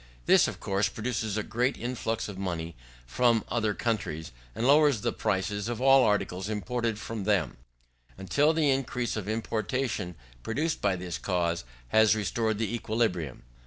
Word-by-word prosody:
This - - +6
of - - -6
course 100 +1 0
produces 110 -2 -2
a 105 - 0
great 125 +6 0
influx 115 -2 -2
of 100 - -7
money 85 -3 -3 0.3
from 115 - +2
other 110 -3 0
countries, 80 -9 -2 0.2
and 115 - -1
lowers 145 -4 +5
the - - 0
prices 100 +3 -1
of 120 -1 -3
all 135 0 +6
articles 100 -2 0
imported 115 +1 -2
from 110 -1 -5
them, 95 - +1 0.6
until 140 - +2
the 155 -3 +2
increase 125 -3 -1
of 105 -2 -4
importation 110 -3 -2 0.3
produced 155 - -1
by 100 -2 +2
this 90 -1 -5
cause 85 -5 -1 0.2
has 110 - +5
restored 110 +1 0
the 115 +1 -2
equilibrium. 105 - -1
110 Hz, 155 wpm, -28 LUFS, 95-120 Hz, 0.6 s, This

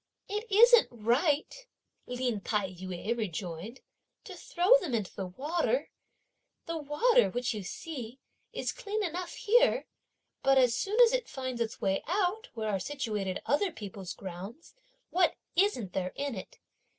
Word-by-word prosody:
"It 420 +3 -3
isn't 470 +3 +7
right," 285 - 0 0.4
Lin 250 -4 -2
Tai 200 -2 -1
yü 185 +4 -4
rejoined, 195 +1 -5 0.4
"to - - -9
throw 355 +4 -1
them 295 - -2
into 210 -5 -3
the 190 -2 -4
water. 310 - -1 0.7
The 330 -1 -3
water, 455 - +3
which 245 0 -1
you 210 - -4
see, 245 - -7 0.3
is - - -2
clean 430 -3 -3
enough 355 0 -4
here, - - +3 0.6
but 270 0 +4
as 250 -3 +5
soon 400 - -1
as 475 0 +7
it - - -1
finds 260 -3 -4
its 230 0 -2
way 195 -2 +1
out, 395 +6 0
where 220 -1 -2
are 195 - 0
situated 210 -6 -3
other 340 +7 +2
people's 200 - -7
grounds, 195 - -9 0.4
what 360 -1 +3 0.2
isn't 335 - +1
there 185 -1 -2
in 280 -1 -2
it? 190 - -8
260 Hz, 150 wpm, -30 LUFS, -, 0.7 s, isn't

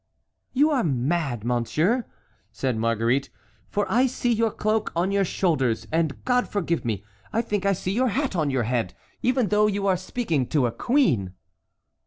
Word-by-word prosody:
"You 295 +4 +3
are 270 -5 +2
mad, 135 -3 -1
monsieur," 150 - +1 0.4
said 130 -3 -1
Marguerite, 115 +4 +1 0.4
"for 205 0 0
I 250 +3 +3
see 245 -1 -1
your 225 0 +2
cloak 215 +1 -1
on 175 +3 +1
your 200 0 +2
shoulders, 150 -11 0
and, 160 -2 -1
God 250 0 +2
forgive 170 -4 -1
me, 110 -5 -2 0.3
I 230 +1 +1
think 205 -3 -1
I 200 - +4
see 185 0 -3
your 250 +6 +2
hat 265 0 -1
on 155 -4 +1
your 130 -3 0
head, 115 -4 -1 0.3
even 250 -4 +1
though 210 0 +4
you 200 -1 -1
are 190 -2 +3
speaking 170 - -1
to 145 -5 +2
a 120 - 0
queen." 135 - +1
180 Hz, 175 wpm, -25 LUFS, -, 0.4 s, I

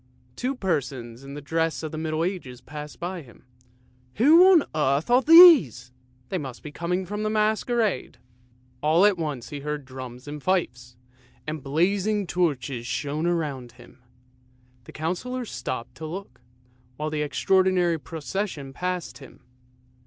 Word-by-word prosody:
Two 260 +2 -2
persons 135 - -3
in 140 +1 -9
the 145 - -8
dress 165 +2 -1
of 155 - -4
the 155 - -6
Middle 160 0 -1
Ages 170 -9 -4
passed 150 0 -9
him. 170 -10 -7 0.3
" 125 0 -35
Who 330 - +7
on 335 -6 +6
earth 150 - 0
are 250 +2 +6
these? 290 - +7 0.4
They 190 - -2
must 130 -5 -8
be 150 - -8
coming 180 +4 -2
from 210 +3 -4
a 215 - 0
Masquerade." 215 - 0 0.6
All 160 +6 +4
at 205 -4 +3
once 140 -7 -4
he 145 - -6
heard 150 0 -4
drums 130 0 -9
and 145 0 -7
fifes, 125 -9 -2 0.5
and 155 -1 -5
blazing 195 +8 0
torches 140 -9 -1
shone 150 +5 -2
around 145 -8 -2
him; 125 +1 -17 0.9
the - - -11
Councillor 210 +11 -3
stopped 125 - -5
to 160 - -6
look, 190 -2 -8 0.6
while 155 +1 -3
the 155 -1 -2
extraordinary 180 +2 +2
procession 160 -2 -5
passed 180 +2 -4
him. 135 - -15
155 Hz, 145 wpm, -25 LUFS, 135-190 Hz, 0.9 s, Who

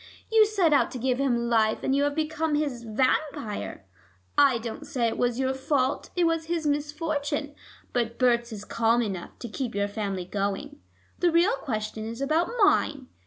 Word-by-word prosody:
You 440 -1 +6
set 380 -7 +2
out 285 - +4
to - - -4
give 250 +1 0
him 240 -4 +1
life, 220 -2 +2
and 270 - +1
you 280 - +2
have 290 0 -1
become 315 0 0
his 285 -5 -1
vampire. 245 - -1 0.5
I 275 -4 +5
don't 235 +6 -6
say 265 -5 0
it 225 - -2
was 245 -1 +1
your 265 0 +1
fault: 265 0 0
it 355 - +2
was 330 -1 +1
his 330 -1 -2
misfortune. 295 0 -1 0.4
But 235 -1 -1
Berts 240 -2 +2
is 210 -1 -7
calm 230 +1 +2
enough 190 -5 -5
to 240 - -7
keep 240 0 -4
your 200 0 +1
family 200 -3 -3
going. 205 +10 -3 0.4
The 355 - +4
real 345 +7 +4
question 215 -3 -4
is 230 +2 -6
about 310 +5 +1
mine. 285 -9 +2
265 Hz, 180 wpm, -27 LUFS, 230-300 Hz, 0.5 s, You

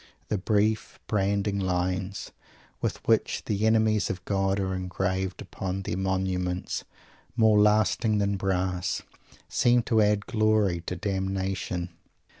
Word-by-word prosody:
The 105 - 0
brief, 105 +2 0
branding 100 0 0
lines, 90 +1 -2 0.5
with - - -3
which - - +2
the 105 +1 +1
enemies 110 -2 +3
of 90 0 -5
God 95 0 +1
are 95 -1 -1
engraved 95 0 -2
upon 95 +1 -4
their - - -3
monuments 95 -1 -1 0.5
"more 110 -3 +5
lasting 105 +1 +3
than 100 0 +1
brass," 95 -1 -1 0.4
seem 120 0 +3
to 110 -1 +3
add 105 0 +2
a - - -11
glory 110 -5 +2
to 90 - -2
damnation. 95 -1 -2
95 Hz, 125 wpm, -27 LUFS, 95-105 Hz, 0.5 s, more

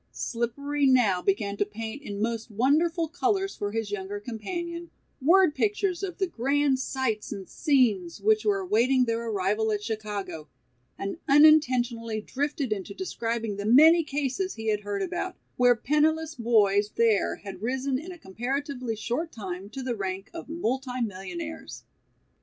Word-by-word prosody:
Slippery 280 +5 -1
now 230 -9 +4
began 200 +1 0
to - - +3
paint 220 +6 -6
in 205 -7 -6
most 225 +1 -2
wonderful 310 - +2
colors 385 +4 0
for 205 0 -3
his 220 -1 -3
younger 205 0 -4
companion, 340 - -5 0.3
word 345 +3 +5
pictures 400 0 0
of 385 -3 -4
the 385 - +1
grand 280 -2 +1
sights 260 -5 -2
and 195 -2 -6
scenes 225 - +1
which 435 0 +3
were 400 -2 +1
awaiting 255 - +3
their 230 0 -1
arrival 210 +1 0
at 210 -1 -2
Chicago, 205 -7 -4 0.5
and 195 +11 -4
unintentionally 255 -7 +4
drifted 280 +1 -2
into 200 -1 -7
describing 230 - -3
the 205 - -4
many 320 +8 +7
cases 295 +6 -2
he 220 0 -3
had 210 -1 +1
heard 205 -1 -3
about, 360 0 -3 0.2
where 245 0 +5
penniless 310 +5 +1
boys 210 -4 +3
there 225 -3 +2
had 195 -2 -9
risen 260 +3 -1
in 340 +5 -8
a 355 - -9
comparatively 250 - -3
short 245 +10 -3
time 190 -2 -6
to 265 +4 -6
the 250 -2 -2
rank 195 -1 -4
of 335 -2 -8
multimillionaires. 225 - -4
240 Hz, 150 wpm, -27 LUFS, 210-300 Hz, 0.5 s, many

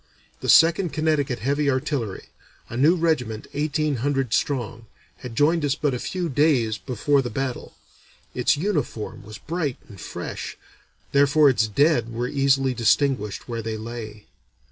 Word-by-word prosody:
The - - -4
Second 170 +1 +5
Connecticut 155 -5 0
Heavy 145 +1 +1
Artillery, 130 -6 -2 0.5
a - - -7
new 150 +8 +4
regiment 145 -11 -1
eighteen 150 -1 0
hundred 135 -1 -1
strong, 120 -4 -1 0.3
had 125 -2 -9
joined 155 +5 +3
us 145 -1 +1
but 145 -3 0
a 125 - -3
few 180 +4 -3
days 135 -7 +2
before 135 +3 +1
the 125 - -4
battle. 130 +1 -4 0.6
Its 125 +3 +2
uniform 150 - -3
was 105 +1 -10
bright 160 -5 -3
and 100 -6 -12
fresh; - - -6 0.5
therefore 140 +1 +5
its 110 -3 +1
dead 120 +1 +2
were 120 +2 -2
easily 135 -1 +2
distinguished 120 -2 +1
where 115 -2 -4
they 110 0 -4
lay. 110 -2 -8
135 Hz, 145 wpm, -23 LUFS, 115-150 Hz, 0.6 s, Second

